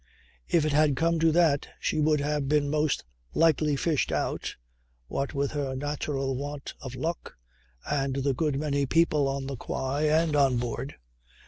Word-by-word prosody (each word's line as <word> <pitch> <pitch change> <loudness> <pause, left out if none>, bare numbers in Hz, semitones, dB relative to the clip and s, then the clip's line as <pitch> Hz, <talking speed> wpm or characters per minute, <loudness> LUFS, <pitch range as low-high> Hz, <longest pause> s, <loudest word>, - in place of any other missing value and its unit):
If 165 -3 +3
it 155 - +1
had 150 -1 +4
come 165 +3 +1
to 165 0 +4
that 160 -4 +3
she - - -1
would 150 -1 +3
have 145 -1 -1
been 145 -1 +2
most 150 - 0 0.3
likely 155 -2 +3
fished 150 0 0
out, - - -2 0.5
what 140 - -3
with 140 0 0
her 140 -3 -2
natural 140 -1 -2
want 145 +1 -5
of 130 -1 -7
luck 165 +6 -4 0.5
and 135 -2 0
the 135 0 +1
good 140 +1 0
many 140 -2 0
people 155 -2 +3
on 135 0 -2
the 135 0 -4
quay 140 +6 -1
and 160 0 +2
on 135 -3 +4
board. 120 +3 -4
145 Hz, 165 wpm, -27 LUFS, 135-155 Hz, 0.5 s, had